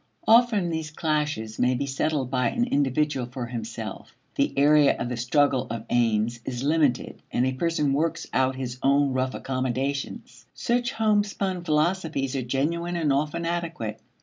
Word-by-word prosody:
Often 220 -6 +5
these 160 -1 -3
clashes 150 -8 -2
may 125 +1 +3
be 140 - -1
settled 135 -1 -1
by 125 -2 +2
an 240 - 0
individual 145 - 0
for 125 0 -5
himself; 120 -1 -6 0.2
the - - +1
area 145 0 +5
of 120 - -3
the 125 - -2
struggle 130 +2 +2
of 115 0 -5
aims 115 0 +1
is 125 -1 -4
limited 145 -4 +1
and 125 - +1
a 130 - 0
person 150 -1 0
works 165 +3 0
out 130 0 +2
his 125 -1 -5
own 140 0 +3
rough 130 0 -1
accommodations. 135 - -3
Such 245 +1 0
homespun 205 -4 0
philosophies 155 -4 0
are 135 - 0
genuine 160 +8 -1
and 155 -5 +1
often 155 +4 -1
adequate. 165 -11 -3
140 Hz, 155 wpm, -25 LUFS, 130-165 Hz, 0.2 s, Often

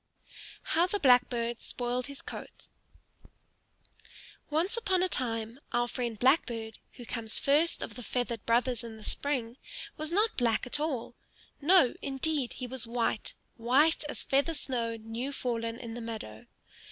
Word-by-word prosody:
HOW 340 +2 +4
THE 410 - -1
BLACKBIRD 245 - +3
SPOILED 245 +1 -2
HIS 280 -1 -8
COAT - - -8 1.8
Once 330 +8 +1
upon 380 -6 +2
a - - +3
time, 230 -5 -2
our 240 0 +2
friend 240 -2 -3
Blackbird, 235 -4 +2
who 245 - -10
comes 225 -2 0
first 300 +4 +3
of - - -6
the 250 - -8
feathered 240 -1 -2
brothers 240 0 +2
in 225 -1 -8
the 215 - -12
spring, 255 -4 -1 0.4
was 310 +1 -1
not 425 +5 +2
black 235 -2 +2
at 250 - -1
all. 290 -6 -2 0.5
No, 325 -4 +6
indeed; 275 -1 0
he 255 - -5
was 250 -1 -5
white 230 -2 -1 0.2
white 270 +9 +4
as - - -4
feather 285 +4 +2
snow 235 -5 -2
new 225 +5 -4
fallen 230 -4 -2
in 235 -2 -7
the 240 - -5
meadow. 215 - -7
245 Hz, 150 wpm, -30 LUFS, 230-285 Hz, 1.8 s, No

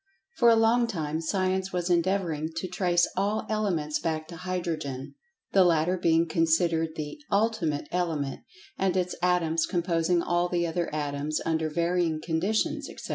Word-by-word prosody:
[Pg 390 0 -39
90] - - -18
For 235 - +6
a 225 -1 +5
long 235 +2 +3
time 160 -5 -3
Science 190 +2 0
was 175 -1 -2
endeavoring 170 -3 +1
to 165 +3 -3
trace 175 -2 +2
all 200 +3 0
elements 180 -9 0
back 155 -2 -2
to 170 - -8
Hydrogen, 160 -7 -4 0.4
the 195 - +6
latter 170 +1 +3
being 170 -2 +2
considered 165 0 +1
the 150 -2 -6
"Ultimate 200 -9 0
Element," 160 -6 -2 0.4
and 190 -1 +1
its 180 -1 0
atoms 170 -2 +2
composing 170 -1 +1
all 175 0 +1
the 175 -1 0
other 170 +1 -1
atoms, 150 0 -2
under 160 -1 0
varying 170 0 0
conditions, 170 +7 -1
etc. - - -9
170 Hz, 160 wpm, -27 LUFS, 160-185 Hz, 0.4 s, For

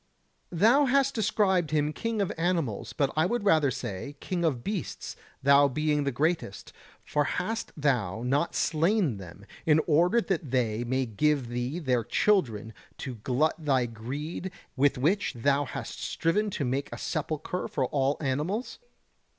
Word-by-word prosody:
Thou 230 - +5
hast 275 +1 +3
described 200 -6 +2
him 150 0 +1
king 225 +1 -1
of 195 - -2
animals, 165 - -1
but 140 -2 0
I 160 +3 +3
would 240 +1 -2
rather 155 -7 +4
say, 120 +4 -5
king 180 -2 -2
of 135 -8 0
beasts, 200 -5 -4 0.3
thou 140 +1 +6
being 150 +1 0
the 140 - +1
greatest 150 - -2 0.3
for 150 - +1
hast 220 +9 -2
thou 120 -8 0
not 140 +6 0
slain 165 - +1
them 95 +1 -11 0.2
in 155 -1 +4
order 175 +8 +4
that 180 - -2
they 120 -3 0
may 130 +2 0
give 135 +3 +1
thee 125 +5 -2
their 130 -8 0
children 115 - +1 0.2
to 130 - -5
glut 130 +8 0
thy 135 -4 +2
greed 135 +11 -5 0.3
with 140 0 +3
which 165 +5 +1
thou 140 +4 +2
hast - - -6
striven 210 +6 0
to 155 -7 -2
make 135 +3 -2
a - - -6
sepulchre 160 +4 -3
for 135 - -1
all 140 +2 0
animals? 155 - -2
150 Hz, 155 wpm, -28 LUFS, 130-180 Hz, 0.3 s, thou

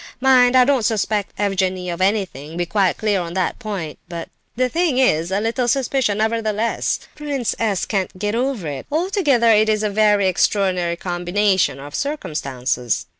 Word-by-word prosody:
Mind, 255 -1 +5
I 255 -1 +6
don't 275 -2 +2
suspect 215 -2 0
Evgenie 185 -2 -1
of 170 +2 -5
anything, 185 -7 -1
be 175 - 0
quite 190 0 +1
clear 205 -3 0
on 170 0 -6
that 185 -1 -1
point; 200 -10 -5
but 170 -1 -6 0.3
the 255 +1 +1
thing 325 -1 0
is 170 -11 +2
a 195 +1 0
little 230 +3 -1
suspicious, 260 -3 +1
nevertheless. 220 0 -1
Prince 285 -5 -2
S. 210 -5 0
can't 190 -2 -2
get 205 +2 -2
over 240 - -1
it. 140 -2 -6
Altogether 300 - +2
it 215 0 +4
is 215 0 +1
a 210 - 0
very 205 -1 +3
extraordinary 185 -2 +1
combination 180 -2 0
of 145 +1 -10
circumstances." 130 - -2
205 Hz, 165 wpm, -20 LUFS, 180-240 Hz, 0.3 s, I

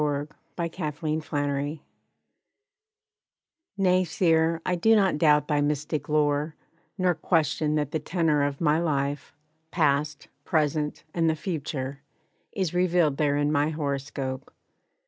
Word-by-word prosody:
=To 150 - +2 0.5
An 170 -2 -2
Astrologer= 150 -2 -2 2.0
Nay, 185 -1 +3
seer, 165 -1 +2
I 180 - +1
do 220 +6 +4
not 190 -7 +2
doubt 150 -2 +4
thy 150 -2 +1
mystic 150 0 -2
lore, 150 0 +1 0.4
Nor 185 -2 +2
question 155 -2 +1
that 150 -2 -1
the 160 - -1
tenor 165 -5 +1
of 140 -1 -1
my 155 -1 +2
life, 145 -4 -2 0.3
Past, 150 -2 0 0.2
present 150 -2 0
and 165 -1 +2
the 160 - +1
future, 145 -4 -4 0.5
is 185 -5 -2
revealed 175 -5 +2
There 145 -2 +2
in 145 0 +1
my 150 0 +2
horoscope. 140 -3 -4
150 Hz, 125 wpm, -26 LUFS, 145-165 Hz, 2.0 s, do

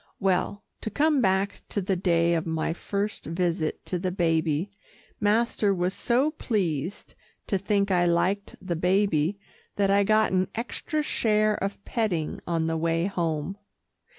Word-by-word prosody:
Well 190 +1 0 0.2
to - - -3
come 295 +4 +2
back 195 -1 +1
to - - -1
the 190 0 0
day 170 -2 +2
of 165 +1 -1
my 160 0 -1
first 200 +4 -3
visit 165 -1 -1
to 180 - -2
the 185 +1 -1
baby. 165 0 +1 0.5
Master 210 -1 +2
was 180 +1 0
so 255 +8 +1
pleased 185 - -2 0.3
to 195 - 0
think 200 0 +1
I 175 -1 +3
liked 185 +4 0
the 185 -2 -3
baby, 180 0 +2 0.4
that 200 -1 +2
I 200 0 +4
got 215 +2 +3
an 185 0 +2
extra 300 +6 -2
share 215 -6 +2
of 200 -1 -4
petting 185 -10 -1
on 165 -2 0
the 165 0 0
way 165 +1 +1
home. 175 0 -2
190 Hz, 150 wpm, -26 LUFS, 170-205 Hz, 0.5 s, I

